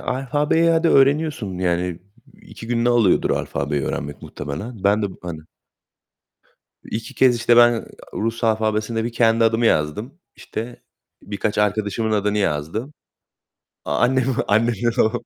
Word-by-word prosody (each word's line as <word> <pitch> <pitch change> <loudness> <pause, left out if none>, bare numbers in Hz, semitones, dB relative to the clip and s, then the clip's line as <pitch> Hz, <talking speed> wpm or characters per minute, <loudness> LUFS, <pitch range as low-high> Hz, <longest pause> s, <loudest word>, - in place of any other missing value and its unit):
alfabeyi, 150 +5 +1
hadi, 165 0 +2
öğreniyorsun 140 - +2
yani 90 -1 -1 0.4
2 115 - -11
gününü 120 0 +1
alıyordur 120 -6 +3
alfabeyi 70 0 -2
öğrenmek 75 +2 -4
muhtemelen. 100 - -7
Ben 105 +2 +3
de, 100 - -1
b - - -11
hani, 85 -3 -6 1.4
2 110 +1 -6
kez, 130 -2 +4
işte 120 0 +3
ben, 120 -1 +5 0.3
Rus 115 +2 -3
alfabesinde 110 0 0
bir 120 - -3
kendi 115 -1 +3
adımı 115 +1 +2
yazdım. 105 - 0 0.2
İşte, 120 +2 -7 0.4
birkaç 100 +1 -3
arkadaşımın 105 +1 0
adını 105 0 0
yazdım. 100 - -2 0.9
A - - -1
annem, 130 0 +2 0.2
annemin 115 +2 +2
o 110 - +3
110 Hz, 130 wpm, -21 LUFS, 100-120 Hz, 1.4 s, ben